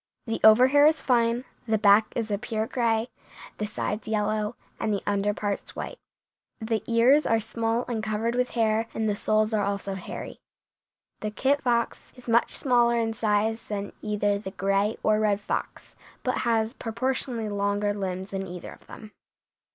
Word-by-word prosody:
The 225 -2 -2
overhair 260 +7 +7
is 315 -3 0
fine, 240 0 +2 0.2
the 220 -1 +2
back 210 +1 +5
is 225 -2 -2
a 200 - 0
pure 220 -2 -2
gray, 230 -1 0 0.5
the 210 - -1
sides 210 0 -4
yellow, 215 +1 -1 0.2
and 220 - -1
the 200 - -1
under 205 0 +1
parts 205 -1 -3
white. - - -6 0.6
The 220 -2 -1
ears 245 +6 +4
are 225 - +3
small 225 +2 -1
and 230 -3 -2
covered 215 +2 -1
with 250 0 0
hair 225 0 +2
and 220 0 0
the 205 - +1
soles 215 +1 +1
are 210 -2 +2
also 200 0 -2
hairy. 190 -2 -7 0.8
The 215 - -3
kit 270 +6 +1
fox 235 -2 -1
is 250 -1 -15
much 235 0 +3
smaller 240 -3 +3
in 225 -1 0
size 220 +1 0
than 205 -1 -4
either 205 -1 0
the 200 - -6
gray 195 +2 0
or 215 0 +3
red 210 -2 +2
fox, 205 - -5 0.3
but - - 0
has 225 0 +1
proportionately 235 -1 -2
longer 205 0 0
limbs 190 -1 -4
than 195 0 -4
either 180 0 -8
of - - -16
them. 215 -1 -11
220 Hz, 170 wpm, -26 LUFS, 205-235 Hz, 0.8 s, overhair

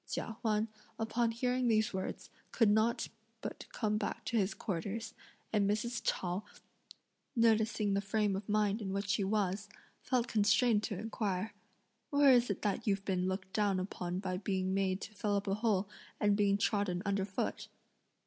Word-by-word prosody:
Chia 225 - -3
Huan 220 -1 +1 0.3
upon 230 +1 +1
hearing 250 +2 0
these 220 0 +3
words 190 0 -4 0.2
could 225 -4 +4
not 220 +2 +2 0.3
but - - -6
come 215 -2 0
back 210 - -3
to 235 - -2
his 200 -2 +2
quarters; 200 +5 -3 0.4
and 205 -2 +3
Mrs. 225 +2 -1
Chao 180 +2 -1 0.9
noticing 220 -3 +3
the 200 - +2
frame 205 0 +1
of 195 +2 -5
mind 210 +1 +2
in 190 -2 -3
which 200 0 0
he 200 - +1
was 200 0 0 0.3
felt 250 -2 +1
constrained 220 +1 +3
to 205 - -3
inquire: 210 -1 -2 0.6
"Where 285 -2 +6
is 245 -2 +5
it 200 - -2
that 205 +1 -1
you've 200 -1 +1
been 185 -1 0
looked 190 0 -3
down 205 -3 +2
upon 180 -1 -3
by 185 -1 -2
being 190 -1 -1
made 190 0 +1
to 215 - -7
fill 205 0 0
up 200 - 0
a 195 - +1
hole, 210 -2 +1 0.3
and 205 -1 +3
being 200 -1 +3
trodden 200 -3 0
under 200 -1 +1
foot?" 190 -1 -3
205 Hz, 170 wpm, -34 LUFS, 195-220 Hz, 0.9 s, Where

